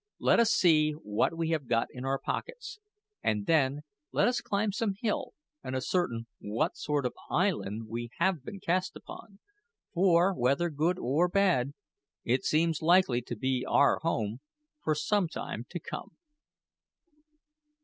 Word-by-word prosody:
Let - - +3
us 230 -2 +4
see 155 -3 +4
what 120 +3 -1
we 165 -1 -1
have 155 -5 -1
got 115 -1 +1
in 125 +1 -7
our 135 0 +1
pockets; 435 - -5 0.4
and 105 -1 0
then 145 -3 +2 0.3
let - - +3
us 245 0 +1
climb 205 +1 0
some 205 -1 -1
hill 215 -2 -2 0.3
and 130 - -4
ascertain 130 -4 -1
what 105 +2 -1
sort 145 -2 -1
of 125 - -1 0.2
island 130 - 0
we 120 +2 -5
have 170 -5 +1
been 195 - -8
cast 185 +1 -1
upon, 200 -2 -11 0.6
for, 180 +1 +4
whether 140 +4 +1
good 160 +5 +1
or 150 +5 +2
bad, 175 -9 +2 0.5
it 125 +3 +1
seems 160 0 +1
likely 165 -7 +4
to 120 - -6
be 130 +2 -1
our 140 - +3
home 115 -8 -2 0.4
for 155 - +1
some 180 +5 +1
time - - -6
to - - -5
come." - - -8
155 Hz, 150 wpm, -30 LUFS, 125-185 Hz, 0.6 s, us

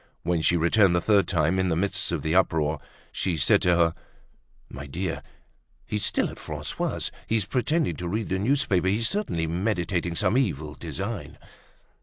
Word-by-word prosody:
When 85 -1 0
she 85 +2 +3
returned 85 +2 +4
the - - +3
third 100 0 +3
time, 85 +1 +1
in 95 - +1
the 85 - +1
midst 95 +4 0
of - - -2
the 80 - 0
uproar, 80 -5 +2 0.3
she 90 -3 -1
said 70 - +4
to 90 -1 +3
her: 85 -1 +3 0.7
"My 75 +2 -9
dear, 85 +5 -3 0.6
he's 105 -1 -3
still - - +1
at - - -12
Francois's; - - -3 0.2
he's 110 -3 +1
pretending 125 - 0
to 90 - -4
read 110 +4 -2
the 95 - 0
newspaper. 110 -6 +1
He's 110 +5 +2
certainly 195 - -1
meditating 90 -1 -1
some 120 +9 +2
evil 80 - -2
design." 70 - -5
90 Hz, 170 wpm, -26 LUFS, 85-105 Hz, 0.7 s, returned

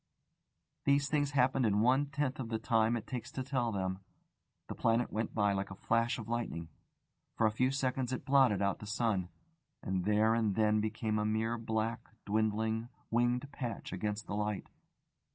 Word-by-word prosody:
These 140 0 +3
things 145 -2 +1
happened 130 0 +3
in 105 -2 +3
one 130 +5 +3
tenth 140 -2 -2
of 120 -4 -4
the 115 - 0
time 115 0 +2
it 110 - -7
takes 125 -3 -5
to 130 - -3
tell 130 -3 0
them. 95 -2 -2 0.7
The - - -4
planet 115 +1 +1
went 110 0 -2
by 105 -2 +3
like 95 0 -2
a 95 - -7
flash 115 +3 +1
of 115 - -7
lightning; 115 -8 -3 0.7
for 115 - +2
a 110 - +4
few 125 +4 +2
seconds 130 -2 -1
it 130 - -3
blotted 130 -8 +4
out 100 0 0
the 105 - -8
sun, 105 -4 0 0.5
and 95 -1 -1
there 105 +2 +4
and 110 -4 +1
then 105 0 +3
became 110 0 -1
a - - 0
mere 110 +2 0
black, 115 0 -2 0.2
dwindling, 110 +2 0 0.2
winged 120 +3 +2
patch 120 -8 -5
against 105 +3 -3
the - - -5
light. 105 -1 -2
110 Hz, 180 wpm, -33 LUFS, 105-125 Hz, 0.7 s, a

